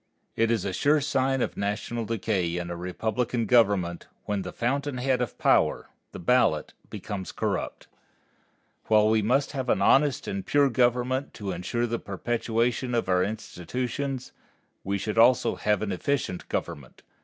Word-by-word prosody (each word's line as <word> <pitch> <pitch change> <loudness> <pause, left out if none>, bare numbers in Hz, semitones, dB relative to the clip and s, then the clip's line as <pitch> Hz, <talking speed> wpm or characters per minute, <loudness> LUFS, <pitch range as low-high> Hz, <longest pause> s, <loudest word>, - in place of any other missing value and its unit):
It 115 0 +2
is 115 -5 0
a 95 - -2
sure 145 +9 +3
sign 135 -2 +1
of - - -3
national 105 +3 -3
decay 95 -6 -1
in 85 0 -4
a - - -3
republican 110 +7 -2
government, 100 -7 +2 0.2
when 105 -1 -1
the - - -6
fountain 140 +3 -1
head 125 0 +1
of 120 - -3
power, - - +2 0.2
the - - -8
ballot, 90 -5 +2 0.2
becomes 100 -2 -6
corrupt. - - -3 1.0
While 110 -1 +4
we 110 0 +3
must 130 +7 +1
have 130 -3 -4
an - - +3
honest 140 +7 +3
and 200 -1 -3
pure 145 -5 +3
government 125 +3 +1
to 100 -3 -4
insure 95 +7 -2
the 115 0 -2
perpetuation 120 +4 -1
of 115 -5 -1
our 90 0 +3
institutions, 125 - -4 0.5
we 100 +1 -1
should 105 +3 -2
also 120 +2 +5
have 105 -1 0
an 105 - -2
efficient 95 -1 -2
government. 70 -4 -5
115 Hz, 155 wpm, -26 LUFS, 100-130 Hz, 1.0 s, also